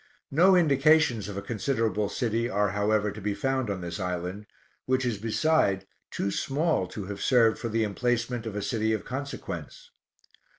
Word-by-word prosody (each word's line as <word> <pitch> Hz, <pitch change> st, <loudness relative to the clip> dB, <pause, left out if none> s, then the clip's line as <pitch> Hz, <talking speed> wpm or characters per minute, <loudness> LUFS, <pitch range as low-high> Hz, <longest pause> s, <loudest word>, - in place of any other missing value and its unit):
No 180 Hz, +7 st, +5 dB
indications 145 Hz, -, +4 dB
of 100 Hz, -, -6 dB
a 100 Hz, -, -4 dB
considerable 110 Hz, -3 st, -1 dB
city 115 Hz, 0 st, -1 dB
are 105 Hz, -1 st, +1 dB
however 105 Hz, +1 st, +1 dB
to 110 Hz, -, -9 dB
be 100 Hz, 0 st, -1 dB
found 130 Hz, -2 st, -1 dB
on 95 Hz, -2 st, -3 dB
this 85 Hz, -1 st, -5 dB
island, 90 Hz, +3 st, -4 dB, 0.4 s
which 130 Hz, 0 st, +1 dB
is 115 Hz, -5 st, -1 dB
beside 110 Hz, -4 st, +1 dB, 0.2 s
too 100 Hz, -, -2 dB
small 145 Hz, -, 0 dB
to 100 Hz, +2 st, -7 dB
have 100 Hz, +1 st, -6 dB
served 115 Hz, -4 st, +4 dB
for 115 Hz, -, -3 dB
the 115 Hz, 0 st, +1 dB
emplacement 120 Hz, +2 st, -1 dB
of 105 Hz, -, -5 dB
a 105 Hz, -, -2 dB
city 110 Hz, 0 st, 0 dB
of 110 Hz, -, -3 dB
consequence. 145 Hz, -, -6 dB
110 Hz, 170 wpm, -27 LUFS, 100-130 Hz, 0.4 s, No